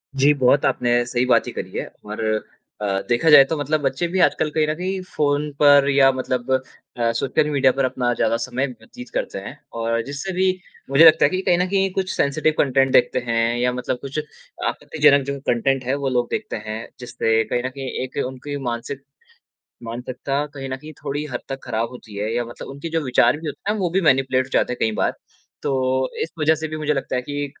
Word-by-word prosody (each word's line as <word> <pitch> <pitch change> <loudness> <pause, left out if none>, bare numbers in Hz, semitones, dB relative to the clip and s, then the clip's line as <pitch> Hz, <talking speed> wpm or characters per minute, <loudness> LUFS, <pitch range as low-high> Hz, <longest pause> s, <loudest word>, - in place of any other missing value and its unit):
जी, 140 +2 +5
बहुत 140 0 +3
आपने 120 0 +2
सही 120 +1 0
बात 125 - +4
ची - - -5
करी - - -6
है - - -3 0.2
और 105 +1 -6 0.6
अ, 105 - -1 0.2
देखा 120 +7 +3
जाए 150 -2 +10
तो 155 +4 -3
मतलब 150 +1 0
बच्चे 145 +4 0
भी 185 +2 -2
आजकल 155 - +2
कहीं 155 -1 +3
न 155 - 0
कहीं 185 +3 -3
फ़ोन 145 0 +1
पर 145 -1 +6
या 135 -1 +5
मतलब 130 -1 -3 0.5
अ, 115 -1 +1
सोशल 135 +5 0
मीडिया 135 -3 +3
पर 135 0 0
अपना 125 -1 0
ज़्यादा 115 0 +1
समय 130 +3 -2
व्यतीत 125 0 -12
करते - - -2
हैं। 115 +9 -9 0.2
और 115 0 0
जिससे 140 +7 -5
भी 185 +1 +1 0.4
मुझे 140 +4 +7
लगता 160 - +7
है - - +3
कि 185 +3 -1
कहीं 175 - +2
न 180 - +2
कहीं 195 -1 +1
कुछ 190 -1 -1
सेंसिटिव 155 +2 +1
कंटेंट 135 -1 +3
देखते - - +4
हैं 115 +1 +1
या 125 +1 +2
मतलब 125 0 -2
कुछ 140 +2 -4 0.5
आपत्तिजनक 145 -3 +2
जो 140 0 -3
कंटेंट 130 +2 +1
है 130 +3 0
वो - - +2
लोग 120 -2 +1
देखते - - -3
हैं 110 0 -3 0.2
जिससे 115 -2 0
कहीं 120 +2 -2
न 130 - -1
कहीं 135 0 -6
एक 130 - -8
उनकी 135 +2 -6
मानसिक 125 +4 -5 0.8
मानसिकता 125 +4 -3
कहीं 135 -2 -6
न 130 - -2
कहीं 150 +4 -11
थोड़ी 145 +2 -3
हद 120 - -2
तक 135 0 -4
ख़राब 115 +1 -2
होती 115 -4 -12
है 105 +2 -2
या 120 - +1
मतलब 120 - -9
उनके 140 +4 -6
जो 165 0 0
विचार 125 +1 +3
भी 160 +1 -7
होते 175 +7 -3
हैं 215 - -1
वो 180 -3 0
भी 190 +3 +1
मैनिपुलेट 130 -4 +3
हो - - -16
जाते 125 - +2
हैं - - -7
कई 110 - +1
बार। - - +2 0.5
तो 130 -1 0
इस - - -5
वज़ह 155 +1 +4
से 160 +1 -4
भी 155 0 -5
मुझे 150 -1 0
लगता 135 -2 -3
है 125 - 0
कि 145 +2 -3
135 Hz, 220 wpm, -22 LUFS, 125-150 Hz, 0.8 s, जाए